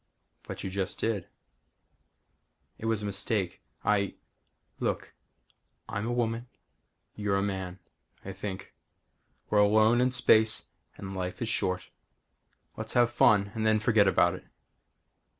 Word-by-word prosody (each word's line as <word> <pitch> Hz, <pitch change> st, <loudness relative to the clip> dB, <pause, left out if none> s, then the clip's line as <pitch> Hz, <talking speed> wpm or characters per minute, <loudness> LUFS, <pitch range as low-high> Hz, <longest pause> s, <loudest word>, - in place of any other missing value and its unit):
"But -, -, -7 dB
you 95 Hz, -, -4 dB
just 95 Hz, 0 st, -2 dB
did." 105 Hz, -6 st, -1 dB, 1.5 s
"It 110 Hz, -, -3 dB
was 110 Hz, -2 st, 0 dB
a -, -, -2 dB
mistake. 100 Hz, -2 st, -2 dB, 0.2 s
I 100 Hz, -2 st, +2 dB, 0.3 s
" -, -, -45 dB
"Look -, -, -3 dB, 0.7 s
I'm 110 Hz, 0 st, -3 dB
a -, -, -1 dB
woman. 120 Hz, 0 st, -1 dB, 0.7 s
You're 105 Hz, -2 st, -1 dB
a 100 Hz, -, +1 dB
man 95 Hz, -2 st, -3 dB, 0.5 s
I 95 Hz, -, -5 dB
think. 95 Hz, 0 st, -6 dB, 0.8 s
We're 105 Hz, -, +4 dB
alone 110 Hz, +3 st, +5 dB
in 125 Hz, -, +3 dB
space 110 Hz, -3 st, +3 dB, 0.3 s
and 95 Hz, 0 st, -7 dB
life 90 Hz, -1 st, -4 dB
is 115 Hz, -, -2 dB
short. 90 Hz, -4 st, -1 dB, 0.8 s
Let's -, -, -6 dB
have 120 Hz, -1 st, +4 dB
fun 100 Hz, -4 st, +4 dB
and 110 Hz, -, -2 dB
then 110 Hz, 0 st, +3 dB
forget 110 Hz, -2 st, +4 dB
about 90 Hz, -2 st, +4 dB
it." -, -, -9 dB
105 Hz, 135 wpm, -29 LUFS, 95-110 Hz, 1.5 s, alone